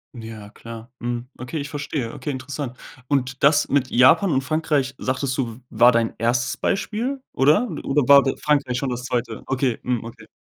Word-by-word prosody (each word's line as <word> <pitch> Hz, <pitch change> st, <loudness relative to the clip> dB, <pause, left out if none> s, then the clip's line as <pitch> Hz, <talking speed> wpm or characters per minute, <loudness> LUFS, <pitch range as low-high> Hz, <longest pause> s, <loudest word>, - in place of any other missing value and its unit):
Ja, 110 Hz, -3 st, -9 dB
klar. 115 Hz, +2 st, -10 dB
Mhm, 120 Hz, +1 st, -4 dB
okay, 130 Hz, +6 st, -6 dB
ich 140 Hz, 0 st, -5 dB
verstehe. 145 Hz, -5 st, -4 dB
Okay, 150 Hz, -, -4 dB
interessant. 130 Hz, -1 st, -5 dB, 0.3 s
Und, 135 Hz, -1 st, -1 dB
das 145 Hz, +1 st, +5 dB
mit 135 Hz, -2 st, +1 dB
Japan 160 Hz, -, +5 dB
und 135 Hz, -2 st, +2 dB
Frankreich, 145 Hz, -2 st, -1 dB
sagtest 130 Hz, 0 st, -2 dB
du, 120 Hz, -3 st, -3 dB
war 120 Hz, +3 st, +5 dB
dein 115 Hz, -1 st, +1 dB
1. 120 Hz, +2 st, 0 dB
Beispiel 245 Hz, +7 st, -2 dB
oder? 150 Hz, -, +3 dB, 0.2 s
Oder 145 Hz, +2 st, +1 dB
war 140 Hz, 0 st, +8 dB, 0.2 s
Frankreich 140 Hz, -4 st, +1 dB
schon 135 Hz, +1 st, -2 dB
das 125 Hz, 0 st, -4 dB
2.? 120 Hz, -3 st, -3 dB
Okay, 130 Hz, -2 st, -1 dB
hm, 125 Hz, -2 st, -1 dB
okay. 115 Hz, -, -11 dB
130 Hz, 175 wpm, -22 LUFS, 120-145 Hz, 0.3 s, war